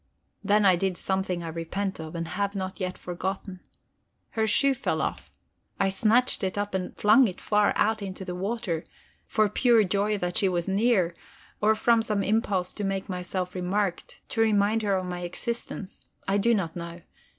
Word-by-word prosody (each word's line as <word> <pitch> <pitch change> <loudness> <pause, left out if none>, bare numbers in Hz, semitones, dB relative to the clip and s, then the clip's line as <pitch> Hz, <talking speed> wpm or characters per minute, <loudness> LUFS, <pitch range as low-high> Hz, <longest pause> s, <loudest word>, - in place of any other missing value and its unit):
Then 210 0 +3
I 185 -2 +6
did 185 0 -1
something 190 -2 -1
I 165 - -4
repent 170 +4 -3
of, 160 +1 -7
and 165 -1 -4
have 200 +1 -2
not 190 0 -4
yet 185 -1 -3
forgotten. 185 +1 -5 0.7
Her 220 -1 0
shoe 275 +6 +4
fell - - -2
off: - - -3 0.5
I 195 -1 +3
snatched 225 +5 +3
it 190 +1 -2
up 205 0 -2
and 185 -1 -3
flung 245 +5 +6
it 185 - -6
far 210 -1 +2
out 220 0 +1
into 190 -1 -6
the 180 - -4
water, 190 -3 -2 0.4
for 215 -1 +2
pure 235 +1 +4
joy 205 +2 0
that 180 -2 0
she 195 -3 +4
was 175 -2 -1
near, 195 -3 +2 0.5
or 215 +1 +4
from 230 +1 +3
some 210 -3 -1
impulse 200 -3 0
to 210 - -5
make 195 0 -2
myself 180 0 -3
remarked, 185 0 -2
to 225 - 0
remind 215 0 +3
her 200 -2 +1
of 185 -1 -1
my 180 -1 -4
existence 200 +2 -5 0.2
I 195 +1 +2
do 235 +3 +3
not 170 -6 -2
know. 170 0 -7
195 Hz, 185 wpm, -27 LUFS, 180-215 Hz, 0.7 s, I